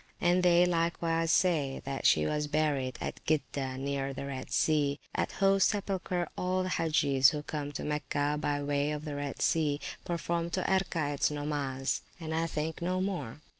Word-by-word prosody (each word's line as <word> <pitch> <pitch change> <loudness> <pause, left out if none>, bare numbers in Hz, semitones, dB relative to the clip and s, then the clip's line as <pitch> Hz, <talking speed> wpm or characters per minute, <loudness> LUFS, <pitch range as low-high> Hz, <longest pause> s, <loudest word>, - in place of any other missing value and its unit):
And 180 0 +3
they 175 0 +5
likewise 165 -1 0
say, 155 -8 +2
that 135 0 0
she 75 - +4
was 150 - -1
buried 145 -4 0
at - - -5
Gidda 140 -4 -1
near 135 0 -2
the 140 - -5
Red 135 -2 -5
Sea; 145 -2 +2
at - - -1
whose 195 -1 +3
sepulchre 185 -4 -1
all 185 +1 0
the 185 - -2
Hagges 145 -6 +4
who 150 -1 -4
come 145 -1 -4
to - - -4
Mecca 150 -1 -1
by 145 -1 -1
way 145 0 0
of 150 +1 -5
the 150 - -4
Red 145 -1 -3
Sea, 150 -3 +2 0.2
perform 170 0 -2
two 185 - -1
Erkaets 165 -7 +1
nomas, 145 -3 -2 0.2
and, 160 -2 -4
I 165 +1 +1
think, 160 +1 -3
no 180 +2 0
more. 175 - -3
150 Hz, 170 wpm, -30 LUFS, 145-170 Hz, 0.2 s, they